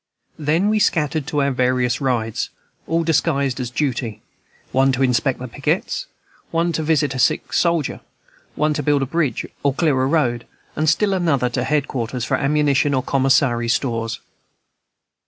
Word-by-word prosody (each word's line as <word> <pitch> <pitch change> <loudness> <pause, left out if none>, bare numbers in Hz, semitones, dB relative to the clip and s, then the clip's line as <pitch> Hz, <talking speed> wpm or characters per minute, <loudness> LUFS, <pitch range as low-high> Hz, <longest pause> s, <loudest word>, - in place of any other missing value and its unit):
Then 160 +7 +1
we 215 0 +2
scattered 155 -7 +1
to 150 -3 0
our 140 - +1
various 125 -1 +1
rides, 115 -5 -1 0.4
all 165 +1 +1
disguised 140 -5 +1
as 125 -2 -3
duty; 120 -4 -2 0.5
one 135 +1 +3
to 130 +1 +1
inspect 130 +1 +1
pickets, - - -1 0.4
one 170 +1 0
to 160 - -2
visit 155 -2 +1
a 130 - -4
sick 120 - +1
soldier, 170 -4 +1 0.6
one 150 0 +1
to 150 - -2
build 145 -2 +2
a - - 0
bridge 145 -4 -1 0.2
or 140 -1 +1
clear 145 -6 +2
a 130 - +2
road, 130 -6 0 0.3
and 155 +1 +2
still 200 +5 +2
another 160 -9 +1
to 125 0 -1
head 150 +2 0
quarters 120 -1 -3
for - - +1
ammunition 145 -1 +2
or 130 - 0
commissary 130 -3 +2
stores. 115 -2 -1
140 Hz, 160 wpm, -20 LUFS, 125-155 Hz, 0.6 s, one